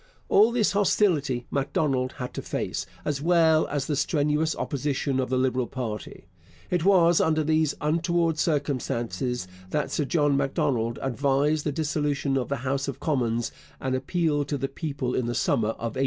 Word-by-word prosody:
All 215 +4 +6
this 235 -3 +2
hostility 165 - +2
Macdonald 135 -2 0
had 125 0 -6
to - - -4
face, - - -3 0.2
as 145 -2 -1
well 160 -1 +4
as 145 -2 -2
the 150 - -1
strenuous 150 +2 +1
opposition 140 -1 -1
of 130 - -1
the 130 - +1
Liberal 130 -1 +1
party. 115 -6 -6 0.5
It 175 -3 +1
was 175 -3 +5
under 155 -1 +2
these 155 -1 +1
untoward 165 +1 +1
circumstances 125 - -1 0.2
that 150 +8 -1
Sir 150 - 0
John 145 -1 +2
Macdonald 130 -4 0
advised 140 +3 +1
the - - +1
dissolution 145 -2 -1
of 130 -2 -1
the 140 - 0
House 135 +1 -1
of 135 -1 -5
Commons 120 -6 0 0.3
and 130 -1 -2
appealed 145 +2 0
to 145 - -1
the 135 +1 -2
people 140 -3 -3
in 125 - 0
the 120 - -2
summer 110 -1 +1
of 115 -1 -4
1872. - - -5
140 Hz, 170 wpm, -26 LUFS, 130-155 Hz, 0.5 s, All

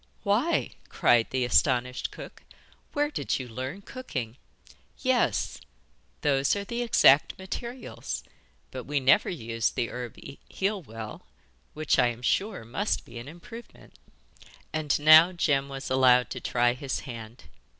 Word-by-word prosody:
'Why,' 235 +12 +1 0.2
cried 120 -2 +3
the 130 -1 0
astonished 125 0 +1
cook, - - -11 0.5
'where 295 0 0
did - - -1
you 130 - -6
learn 130 - -6
cooking? 130 - -6 0.6
Yes, 255 -2 0 0.6
those 140 +1 +2
are 200 - -3
the 235 +4 -4
exact 150 - +5
materials, 235 +7 -6 0.5
but 130 - -7
we 145 +1 0
never 130 0 +4
used 115 - -2
the 120 - -1
herb 125 -2 -7 0.3
heal 200 +1 -1
well, 110 -6 -9 0.5
which, 155 -1 +1
I 125 - +5
am 120 0 -5
sure, 195 - 0
must 195 - -2
be 120 - -9
an 120 - -9
improvement.' 200 +10 -13 0.7
And 155 -3 0
now 155 +4 +8
Jem 140 -5 +1
was 135 -1 -6
allowed 125 -1 +4
to - - -5
try 120 0 +2
his 135 +1 -4
hand. 115 -2 -9
135 Hz, 140 wpm, -27 LUFS, 125-190 Hz, 0.7 s, now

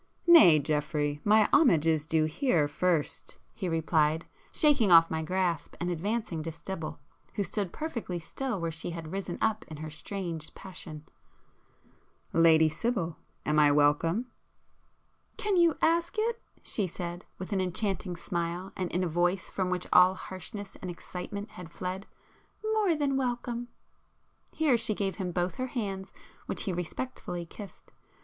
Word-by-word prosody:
"Nay, 215 - +9
Geoffrey, 150 0 -1
my 215 0 +5
homage 215 - +5
is 160 -2 +2
due 160 -1 +3
here 155 - +2
first,"—he 175 +4 -2
replied, 160 -1 +2 0.3
shaking 285 - +3
off 165 -1 +8
my 160 0 -1
grasp, 175 -1 -1
and 175 +1 -1
advancing 185 -1 -2
to 165 +1 -4
Sibyl, 165 -1 -6 0.4
who 205 - +1
stood 195 0 -2
perfectly 235 - -4
still 220 +7 -4
where 165 -1 -2
she 160 +2 -5
had 165 -2 -6
risen 190 -2 -4
up 220 +1 +1
in 155 - -8
her 155 +1 -6
strange 165 -1 -5
passion—"Lady 160 - -2
Sibyl, 170 0 -2 0.3
am 150 0 +3
I 145 -1 +6
welcome?" 150 +9 +3 1.1
"Can 415 -2 0
you 340 -3 +4
ask 335 +1 +2
it!" 460 +2 0 0.2
she 205 -4 -1
said, 175 +1 -6
with 190 +3 -5
an 190 - +1
enchanting 185 0 -1
smile, 170 +2 -3
and 185 -2 -3
in 180 +2 0
a - - +1
voice 175 +3 0
from 185 -2 -1
which 180 -1 -1
all 180 +1 +7
harshness 195 +2 -8
and 185 - -5
excitement 185 +4 -6
had 175 -2 -10
fled; 185 +3 -5 0.7
"More 410 -6 +3
than 280 -3 +1
welcome!" 245 -2 -2 0.9
Here 290 -7 +3
she 215 - -1
gave 195 -1 -2
him 185 -3 -2
both 175 +1 -1
her 255 0 -2
hands 195 -6 -4 0.4
which - - -1
he 190 - -2
respectfully 175 0 -4
kissed. 200 +4 -12
180 Hz, 150 wpm, -29 LUFS, 165-215 Hz, 1.1 s, Nay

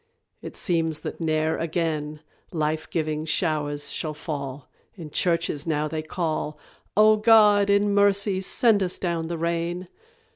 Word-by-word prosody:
It - - -8
seems 165 -4 0
that - - -6
ne'er 155 0 0
again 155 -2 -2 0.3
Life 155 -1 -2
giving 155 -2 -2
showers 150 -3 -1
shall 155 -2 -3
fall. 140 -3 -6 0.3
In 165 -6 -9
churches 165 -3 0
now 155 -1 0
they 155 0 -3
call, 155 -2 -3 0.4
"O 215 0 +6
God, 210 -2 +5
in 200 0 +3
mercy, 200 -1 +3
send 210 +2 +2
us 180 -1 -1
down 170 -3 -2
the 170 0 -3
rain!" 170 +2 -2
165 Hz, 140 wpm, -25 LUFS, 155-190 Hz, 0.4 s, O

